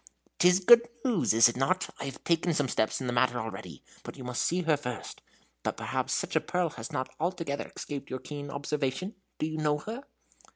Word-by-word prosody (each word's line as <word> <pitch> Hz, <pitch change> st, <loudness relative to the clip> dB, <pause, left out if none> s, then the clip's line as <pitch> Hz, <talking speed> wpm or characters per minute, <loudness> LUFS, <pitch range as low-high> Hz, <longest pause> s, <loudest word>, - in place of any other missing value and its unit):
"'T 175 Hz, -, +6 dB
is 180 Hz, +1 st, +5 dB
good 235 Hz, +5 st, +7 dB, 0.2 s
news, 230 Hz, -10 st, +3 dB
is 115 Hz, +1 st, +8 dB
it 120 Hz, -, -2 dB
not? 180 Hz, +9 st, +1 dB
I -, -, -4 dB
have 135 Hz, -2 st, -7 dB
taken 170 Hz, 0 st, +2 dB
some 145 Hz, -2 st, +1 dB
steps 110 Hz, -3 st, 0 dB
in -, -, -3 dB
the 120 Hz, -, -1 dB
matter 125 Hz, 0 st, +3 dB
already, 110 Hz, -1 st, -7 dB, 0.2 s
but -, -, -9 dB
you 130 Hz, -, -8 dB
must 125 Hz, -1 st, -2 dB
see 180 Hz, +1 st, +1 dB
her 160 Hz, -2 st, +4 dB
first. 125 Hz, -5 st, -6 dB, 0.4 s
But -, -, -2 dB
perhaps -, -, -2 dB
such -, -, -2 dB
a -, -, +4 dB
pearl 180 Hz, -3 st, 0 dB
has 115 Hz, -3 st, -7 dB
not 130 Hz, -, -3 dB
altogether 165 Hz, -4 st, -2 dB
escaped 140 Hz, -2 st, -5 dB
your 130 Hz, -, -2 dB
keen 145 Hz, +1 st, -7 dB
observation? 145 Hz, +6 st, -2 dB, 0.2 s
Do -, -, -1 dB
you 155 Hz, 0 st, -3 dB
know 150 Hz, -1 st, +2 dB
her?" 220 Hz, -, -6 dB
150 Hz, 215 wpm, -29 LUFS, 130-175 Hz, 0.4 s, is